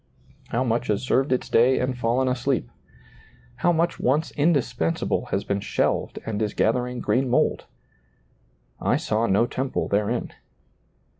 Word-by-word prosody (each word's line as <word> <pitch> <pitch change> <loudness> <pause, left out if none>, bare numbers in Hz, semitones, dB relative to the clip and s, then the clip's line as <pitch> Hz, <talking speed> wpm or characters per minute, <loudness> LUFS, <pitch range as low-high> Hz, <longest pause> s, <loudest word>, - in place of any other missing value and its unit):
how 120 +3 0
much 120 0 0
has 105 +2 0
served 130 +2 +1
its 130 - 0
day 125 +3 +4
and 130 0 -1
fallen 125 +2 +1
asleep! 125 - -1 0.9
how 175 +8 +2
much 170 +1 0
once 150 +6 +1
indispensable 140 - 0
has - - -2
been 100 0 -1
shelved - - -1
and 110 -1 -3
is 105 -1 -1
gathering 125 +2 0
green 130 0 +1
mold! - - +1 0.6
" - - -38
I - - +3
saw 110 +2 0
no 100 +4 +3
temple 130 +2 -2
therein." 100 +1 -1
125 Hz, 145 wpm, -24 LUFS, 110-130 Hz, 0.9 s, day